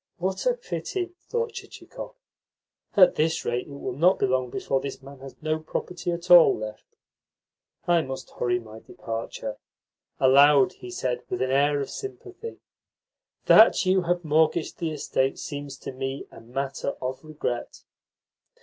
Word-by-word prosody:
"What 190 - -2
a - - +3
pity!" 375 -6 -4 0.2
thought 470 -1 -1
Chichikov. - - -9 0.8
"At 185 -2 +8
this 160 +1 +1
rate 120 +1 -1
it - - -13
will 140 -2 -5
not 175 +8 +4
be - - +1
long 130 -1 0
before 135 +2 -1
this 140 - -6
man 140 0 -12
has 135 0 -10
no 155 0 0
property 175 +3 -4
at 170 +1 -4
all 175 -2 +8
left. 110 0 -8 0.9
I 175 -1 +4
must 135 -3 -7
hurry 120 0 0
my 110 -1 -11
departure." 110 -1 -6 0.6
Aloud 140 +1 +6
he 125 - -11
said 125 0 -2
with 185 - -2
an 130 - -1
air 145 +2 +3
of 135 - -5
sympathy: 400 +3 -8 0.9
"That - - +7
you 185 0 +3
have 175 0 -1
mortgaged 155 +2 +1
the 165 - -1
estate 135 -3 -1
seems 145 -1 -6
to - - -7
me 135 +1 -4
a - - -12
matter 135 +4 -4
of 130 +2 -4
regret." 150 -6 -5
145 Hz, 155 wpm, -26 LUFS, 130-175 Hz, 0.9 s, At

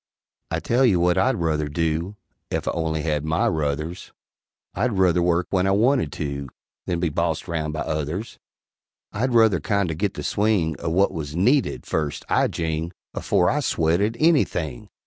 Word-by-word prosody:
] - - -70
I - - -1
tell 125 +3 +1
you 100 -9 +4
what 90 0 +3
I'd 95 - +2
ruther 80 -3 0
do 80 +5 -1 0.3
Ef - - -3
I - - +2
only 80 -2 -2
had 75 -2 -1
my 80 +1 +1
ruthers, 75 +2 -2 0.6
I'd 115 +5 0
ruther 90 -2 +3
work 85 0 +2
when 95 -1 +2
I - - +3
wanted 115 - +2
to 70 -2 -4 0.4
Than 85 -2 -1
be 85 -1 +1
bossed 70 - -1
round 80 -2 -2
by 80 - -3
others; 80 +8 -3 0.7
I'd 120 +4 0
ruther 110 -6 +5
kindo' 100 +1 0
git 100 +5 -2
the - - -5
swing 100 -7 +1
O' - - -2
what 95 +4 +3
was 75 -2 -5
needed, 125 +11 +2
first, 75 -2 -2
I - - +3
jing! 80 +1 -3 0.2
Afore - - +2
I - - 0
swet 80 +3 +1
at 110 +3 0
anything! 85 - +1
85 Hz, 180 wpm, -23 LUFS, 80-100 Hz, 0.7 s, ruther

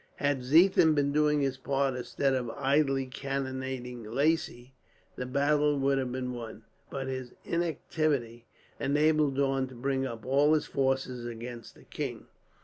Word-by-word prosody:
Had 145 -2 0
Ziethen 160 +4 +5
been 140 -1 +2
doing 150 0 +3
his 135 -1 0
part, 135 -1 0
instead 125 +2 -1
of 125 -3 -1
idly 135 -1 +2
cannonading 130 -2 -4
Lacy, 135 +1 -1 0.4
the 125 - -4
battle 145 +2 +2
would 135 0 +2
have 130 -2 -2
been 125 0 -3
won; 115 -2 -8 0.3
but 135 -1 -4
his 130 -2 -5
inactivity 150 -8 -1 0.3
enabled 150 0 +2
Daun 135 -1 +1
to 130 - -12
bring 135 +2 -1
up 115 -3 -8
all 145 +4 +4
his 155 - 0
forces 130 -2 -1
against 120 0 -8
the - - -17
king. - - -5
135 Hz, 145 wpm, -29 LUFS, 125-145 Hz, 0.4 s, Ziethen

